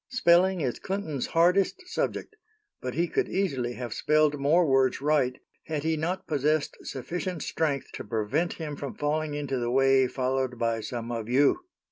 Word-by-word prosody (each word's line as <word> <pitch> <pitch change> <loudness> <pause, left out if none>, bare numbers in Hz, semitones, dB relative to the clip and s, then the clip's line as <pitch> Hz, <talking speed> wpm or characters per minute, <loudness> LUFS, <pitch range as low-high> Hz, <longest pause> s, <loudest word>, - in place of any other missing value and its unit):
"Spelling 185 -6 +4
is 130 -4 -2
Clinton's 175 -9 -3
hardest 180 - +2
subject, 430 - -3 0.5
but 125 0 -4
he 170 +2 +1
could - - -1
easily 135 -11 -1
have 120 -2 -5
spelled 150 -1 +2
more 160 +6 +4
words 135 -3 +3
right 140 -3 +1 0.3
had 155 -2 -2
he 160 0 +1
not 180 +5 -2
possessed 150 -1 0
sufficient 175 +6 -4
strength 140 -5 -1
to - - -6
prevent 115 +10 -1
him 150 -3 -5
from 140 -2 -6
falling 150 0 -1
into 140 -3 -2
the 120 0 -1
way 135 +1 +4
followed 130 0 -1
by 115 -1 0
some 120 +1 -5
of 115 -1 -4
you." 145 - +3
145 Hz, 165 wpm, -27 LUFS, 130-165 Hz, 0.5 s, Spelling